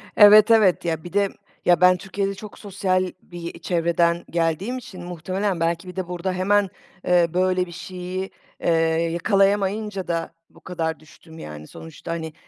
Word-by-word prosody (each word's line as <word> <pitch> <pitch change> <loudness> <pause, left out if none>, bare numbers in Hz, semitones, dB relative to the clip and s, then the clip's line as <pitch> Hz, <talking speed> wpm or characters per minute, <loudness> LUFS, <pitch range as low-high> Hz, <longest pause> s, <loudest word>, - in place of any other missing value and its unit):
Evet, 210 +2 +8
evet. 205 -6 +4
Ya, 160 -1 -2
bir 175 - -10
de, 200 -1 +2 0.4
ya, 175 -1 +4
ben 180 0 +6
Türkiye'de 195 +2 -3
çok 210 +1 -11
sosyal 185 -2 -1
bir 170 -1 -8
çevreden 170 0 +1
geldiğim 170 +8 -1
için 190 -8 -10
muhtemelen 180 +2 -3
belki 170 +2 -1
bir 180 - -9
de 185 -2 -3
burada 180 +1 -3
hemen, 195 +1 +2 0.4
eee, 175 -1 +4
böyle 185 0 +2
bir 175 - -11
şeyi, 185 +2 -6 0.3
eee, - - +2 0.4
yakalayamayınca 195 +2 +1
da 165 -1 -2 0.2
bu - - -20
kadar 165 -3 -3
düştüm, 160 +1 -16
yani, 75 - -9
sonuçta, 160 +1 -9
hani, 160 -2 -4
180 Hz, 160 wpm, -23 LUFS, 170-195 Hz, 0.4 s, Evet